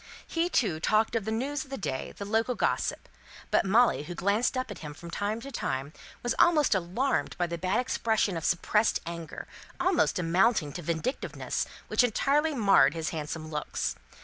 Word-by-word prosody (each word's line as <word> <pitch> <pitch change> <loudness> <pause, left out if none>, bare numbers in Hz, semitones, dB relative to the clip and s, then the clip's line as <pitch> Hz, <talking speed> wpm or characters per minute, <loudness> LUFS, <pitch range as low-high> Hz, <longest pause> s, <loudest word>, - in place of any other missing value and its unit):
He, 335 +1 0
too, 195 - +1
talked 215 +7 +2
of 220 -3 0
the 220 - -2
news 265 +5 -1
of - - -17
the 270 - -4
day, 135 -8 -3
the 200 - -5
local 225 +4 +1
gossip - - -1 0.4
but - - +3
Molly, 230 -3 +4
who 175 - -6
glanced 205 +8 +1
up 255 -3 -2
at 195 - -8
him 150 -2 -8
from 170 +2 -10
time 205 +4 -2
to 275 - -8
time, 140 - -3 0.3
was 240 0 +1
almost 305 -7 +5
alarmed 190 +9 0
by 175 - +1
the 170 0 -4
bad 185 +2 +1
expression 220 -5 0
of 165 - -4
suppressed 210 +6 +2
anger, 170 -2 -6 0.3
almost 360 0 +2
amounting 180 - +2
to 175 - -5
vindictiveness, 170 - -2 0.2
which - - +3
entirely 285 +6 +2
marred 205 -7 +5
his 160 -1 -2
handsome 155 0 -5
looks. 150 -1 -2
205 Hz, 180 wpm, -28 LUFS, 170-245 Hz, 0.4 s, almost